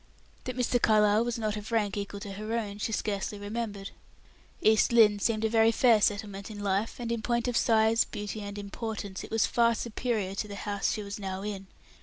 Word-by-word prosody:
That 255 Hz, -1 st, -4 dB
Mr. 245 Hz, -1 st, +1 dB
Carlyle 210 Hz, 0 st, +4 dB
was 240 Hz, 0 st, -2 dB
not 215 Hz, -2 st, -1 dB
of 210 Hz, +2 st, -7 dB
rank 210 Hz, -3 st, +1 dB
equal 200 Hz, 0 st, -4 dB
to 200 Hz, -, -6 dB
her 215 Hz, +3 st, -5 dB
own, 205 Hz, -3 st, -4 dB
she 225 Hz, -, -2 dB
scarcely 205 Hz, -1 st, -2 dB
remembered; 205 Hz, -1 st, -5 dB, 0.7 s
East 220 Hz, +2 st, +4 dB
Lynne 215 Hz, -3 st, +6 dB
seemed 220 Hz, +1 st, 0 dB
a -, -, +4 dB
very 225 Hz, 0 st, +4 dB
fair 230 Hz, -2 st, +4 dB
settlement 205 Hz, -1 st, -1 dB
in 215 Hz, -, -8 dB
life, 200 Hz, +2 st, 0 dB
and 235 Hz, -1 st, -4 dB
in 235 Hz, -1 st, -1 dB
point 235 Hz, +2 st, 0 dB
of 245 Hz, -, -1 dB
size, 225 Hz, 0 st, +4 dB
beauty 210 Hz, +1 st, -6 dB
and 205 Hz, 0 st, -6 dB
importance, 205 Hz, -1 st, -5 dB
it -, -, -9 dB
was 225 Hz, 0 st, +2 dB
far 235 Hz, -1 st, +3 dB
superior 225 Hz, -4 st, -2 dB
to 205 Hz, +2 st, -3 dB
the 200 Hz, -, -7 dB
house 205 Hz, 0 st, -1 dB
she 215 Hz, -, -4 dB
was 200 Hz, +1 st, -6 dB
now 190 Hz, -1 st, -4 dB
in. 200 Hz, -2 st, -5 dB
215 Hz, 210 wpm, -29 LUFS, 205-230 Hz, 0.7 s, Lynne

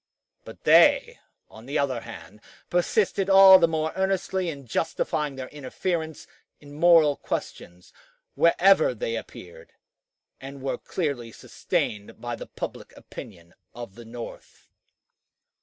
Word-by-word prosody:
But -, -, -13 dB
they, -, -, +4 dB, 0.3 s
on 110 Hz, +3 st, -15 dB
the 140 Hz, -, -2 dB
other 130 Hz, -4 st, -1 dB
hand, 105 Hz, -2 st, -12 dB, 0.3 s
persisted 195 Hz, +2 st, 0 dB
all 195 Hz, -1 st, +9 dB
the 170 Hz, -, +4 dB
more 160 Hz, -1 st, -2 dB
earnestly 190 Hz, -1 st, -1 dB
in 140 Hz, -4 st, -8 dB
justifying 150 Hz, +2 st, -2 dB
their 130 Hz, -1 st, -7 dB
interference 160 Hz, +3 st, -4 dB, 0.3 s
in 145 Hz, -1 st, -14 dB
moral 160 Hz, -2 st, +5 dB
questions 90 Hz, -8 st, -7 dB, 0.4 s
wherever 170 Hz, -4 st, +4 dB
they 115 Hz, +1 st, -3 dB
appeared, 85 Hz, -6 st, -10 dB, 0.7 s
and 135 Hz, 0 st, -10 dB
were 135 Hz, -, -3 dB
clearly 140 Hz, -10 st, -4 dB
sustained 105 Hz, -1 st, -4 dB
by 120 Hz, 0 st, -5 dB
the -, -, -10 dB
public -, -, -8 dB
opinion 85 Hz, -5 st, -12 dB, 0.2 s
of 120 Hz, -4 st, -9 dB
the 120 Hz, -, -12 dB
North. 115 Hz, +1 st, -11 dB
140 Hz, 125 wpm, -25 LUFS, 115-170 Hz, 0.7 s, all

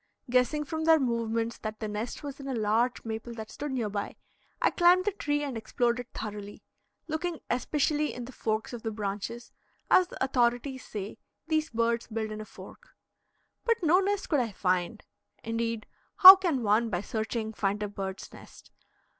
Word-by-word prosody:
Guessing 255 Hz, +4 st, +2 dB
from 315 Hz, +2 st, -4 dB
their 325 Hz, -1 st, +6 dB
movements 230 Hz, -2 st, -1 dB
that 215 Hz, 0 st, -6 dB
the 215 Hz, -, -3 dB
nest 210 Hz, +7 st, -5 dB
was 285 Hz, -1 st, -7 dB
in 275 Hz, -, -8 dB
a 265 Hz, -, -2 dB
large 225 Hz, +3 st, 0 dB
maple 225 Hz, +1 st, -5 dB
that 220 Hz, -1 st, -8 dB
stood 290 Hz, 0 st, -5 dB
near 245 Hz, -5 st, -1 dB
by, 205 Hz, 0 st, -4 dB, 0.4 s
I -, -, +3 dB
climbed 355 Hz, +1 st, +4 dB
the 415 Hz, -, +2 dB
tree 290 Hz, -6 st, -1 dB
and 275 Hz, -4 st, -4 dB
explored 235 Hz, +2 st, 0 dB
it 245 Hz, -, -6 dB
thoroughly, 205 Hz, -1 st, -7 dB, 0.4 s
looking 330 Hz, +1 st, -3 dB
especially 295 Hz, +4 st, 0 dB
in 245 Hz, -, -7 dB
the 255 Hz, -, -10 dB
forks 220 Hz, -1 st, -2 dB
of 240 Hz, -, -6 dB
the 225 Hz, -, -3 dB
branches, 210 Hz, +3 st, -5 dB, 0.4 s
as 370 Hz, -, +6 dB
the -, -, -4 dB
authorities 255 Hz, +1 st, 0 dB
say 205 Hz, -1 st, -7 dB, 0.3 s
these 315 Hz, 0 st, +1 dB
birds 230 Hz, 0 st, 0 dB
build 220 Hz, -1 st, -3 dB
in 215 Hz, 0 st, -5 dB
a -, -, -7 dB
fork. -, -, -14 dB, 0.7 s
But 465 Hz, -1 st, +2 dB
no 340 Hz, +3 st, +5 dB
nest 400 Hz, +1 st, -1 dB
could 295 Hz, -, +2 dB
I 230 Hz, -4 st, -2 dB
find. 185 Hz, +3 st, -1 dB, 0.4 s
Indeed, 230 Hz, 0 st, -2 dB, 0.3 s
how 380 Hz, -1 st, +13 dB
can 340 Hz, -10 st, -1 dB
one 220 Hz, +2 st, +2 dB
by 180 Hz, -3 st, -1 dB
searching 220 Hz, +1 st, -3 dB
find 205 Hz, 0 st, -1 dB
a -, -, -1 dB
bird's 195 Hz, -1 st, -6 dB
nest? -, -, -15 dB
235 Hz, 180 wpm, -28 LUFS, 215-290 Hz, 0.7 s, how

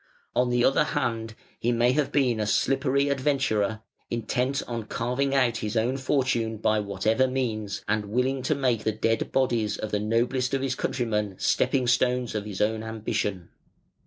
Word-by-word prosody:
On 125 Hz, 0 st, +2 dB
the 120 Hz, 0 st, +2 dB
other 135 Hz, +3 st, +4 dB
hand, 115 Hz, -6 st, -2 dB, 0.2 s
he 120 Hz, -, +1 dB
may 120 Hz, +1 st, +3 dB
have 140 Hz, 0 st, 0 dB
been 125 Hz, -6 st, +2 dB
a 105 Hz, -, 0 dB
slippery 135 Hz, +4 st, +2 dB
adventurer, 130 Hz, -7 st, 0 dB, 0.3 s
intent 125 Hz, +4 st, -1 dB
on 115 Hz, -2 st, -4 dB
carving 125 Hz, +5 st, -1 dB
out 125 Hz, -4 st, +3 dB
his 110 Hz, +1 st, -3 dB
own 120 Hz, +4 st, +1 dB
fortune 130 Hz, -4 st, 0 dB
by 110 Hz, 0 st, +2 dB
whatever 105 Hz, +5 st, +1 dB
means, 110 Hz, -6 st, -3 dB
and 105 Hz, 0 st, 0 dB
willing 125 Hz, +5 st, 0 dB
to 150 Hz, +4 st, 0 dB
make 125 Hz, -5 st, 0 dB
the 110 Hz, -, +1 dB
dead 115 Hz, +1 st, 0 dB
bodies 120 Hz, -5 st, +1 dB
of 110 Hz, -, -5 dB
the 105 Hz, -, +1 dB
noblest 125 Hz, +5 st, 0 dB
of 135 Hz, -, -1 dB
his 135 Hz, -2 st, 0 dB
countrymen 105 Hz, -7 st, -1 dB
stepping 130 Hz, -2 st, +1 dB
stones 125 Hz, 0 st, +1 dB
of 105 Hz, -1 st, -3 dB
his 100 Hz, -3 st, -5 dB
own 110 Hz, +1 st, +1 dB
ambition. 105 Hz, -4 st, -3 dB
120 Hz, 170 wpm, -26 LUFS, 110-130 Hz, 0.3 s, other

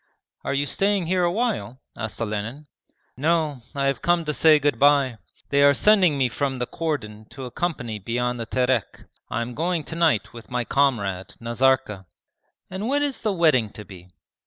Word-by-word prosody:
'Are -, -, -2 dB
you 140 Hz, +1 st, +1 dB
staying 195 Hz, +3 st, 0 dB
here 180 Hz, +2 st, +1 dB
awhile?' 185 Hz, -, -1 dB, 0.2 s
asked 110 Hz, -2 st, -5 dB
Olenin. 115 Hz, +6 st, -4 dB, 0.5 s
'No, 155 Hz, -1 st, 0 dB
I 140 Hz, 0 st, 0 dB
have 135 Hz, -1 st, 0 dB
come 175 Hz, -1 st, +2 dB
to 150 Hz, -, -1 dB
say 155 Hz, +1 st, +6 dB
good 145 Hz, 0 st, 0 dB
bye. 140 Hz, -5 st, +4 dB, 0.3 s
They 140 Hz, 0 st, +3 dB
are 140 Hz, 0 st, +6 dB
sending 190 Hz, -7 st, +4 dB
me 130 Hz, -2 st, +2 dB
from 135 Hz, +2 st, -2 dB
the 125 Hz, -, -2 dB
cordon 115 Hz, -10 st, -4 dB
to 135 Hz, -1 st, -8 dB
a 125 Hz, -, -8 dB
company 125 Hz, -9 st, -3 dB
beyond 120 Hz, +4 st, -2 dB
the 115 Hz, -, -4 dB
Terek. 125 Hz, -2 st, -1 dB, 0.3 s
I 120 Hz, -, -1 dB
am 120 Hz, +1 st, -7 dB
going 165 Hz, +3 st, -1 dB
to 165 Hz, -, -7 dB
night 165 Hz, -, +1 dB
with 115 Hz, -1 st, -12 dB
my 125 Hz, -1 st, -2 dB
comrade 100 Hz, -10 st, 0 dB
Nazarka.' 115 Hz, -5 st, 0 dB, 0.6 s
'And 190 Hz, +4 st, -4 dB
when 285 Hz, +2 st, +1 dB
is 285 Hz, -2 st, -2 dB
the 215 Hz, -, 0 dB
wedding 155 Hz, -, +3 dB
to 105 Hz, -, -10 dB
be?' 90 Hz, -3 st, -13 dB
135 Hz, 185 wpm, -24 LUFS, 115-165 Hz, 0.6 s, say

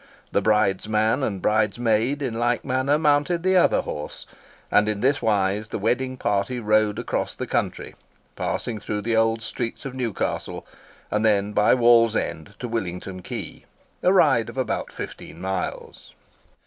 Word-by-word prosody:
The -, -, +2 dB
bridesman 110 Hz, +3 st, +2 dB
and 100 Hz, -8 st, -2 dB
bridesmaid 110 Hz, +5 st, +1 dB
in 125 Hz, -4 st, -2 dB
like 120 Hz, +1 st, 0 dB
manner 130 Hz, +3 st, +1 dB
mounted 150 Hz, +3 st, +2 dB
the 190 Hz, 0 st, +3 dB
other 180 Hz, -, +4 dB
horse; 75 Hz, -, -7 dB, 0.5 s
and 105 Hz, +1 st, +4 dB
in 105 Hz, -1 st, -2 dB
this 140 Hz, +3 st, +2 dB
wise 105 Hz, 0 st, +1 dB
the -, -, -3 dB
wedding 130 Hz, +5 st, -1 dB
party 105 Hz, +3 st, -1 dB
rode 105 Hz, -1 st, +2 dB
across 120 Hz, -, -2 dB
the -, -, -4 dB
country, -, -, -2 dB, 0.4 s
passing 115 Hz, -3 st, -3 dB
through 105 Hz, 0 st, -3 dB
the 115 Hz, +2 st, 0 dB
old 115 Hz, 0 st, +2 dB
streets 115 Hz, +2 st, -5 dB
of 135 Hz, -, -5 dB
Newcastle, 125 Hz, -5 st, -3 dB, 0.5 s
and 105 Hz, +1 st, +1 dB
then 105 Hz, -1 st, +2 dB
by 105 Hz, +3 st, +4 dB
Wallsend 115 Hz, -6 st, +2 dB
to 125 Hz, -, -5 dB
Willington 95 Hz, -4 st, -4 dB
Quay—a 180 Hz, -, -4 dB
ride 140 Hz, -, +4 dB
of -, -, -10 dB
about 130 Hz, -, -2 dB
fifteen 80 Hz, -, -8 dB
miles. 95 Hz, 0 st, -5 dB
115 Hz, 150 wpm, -24 LUFS, 105-125 Hz, 0.5 s, other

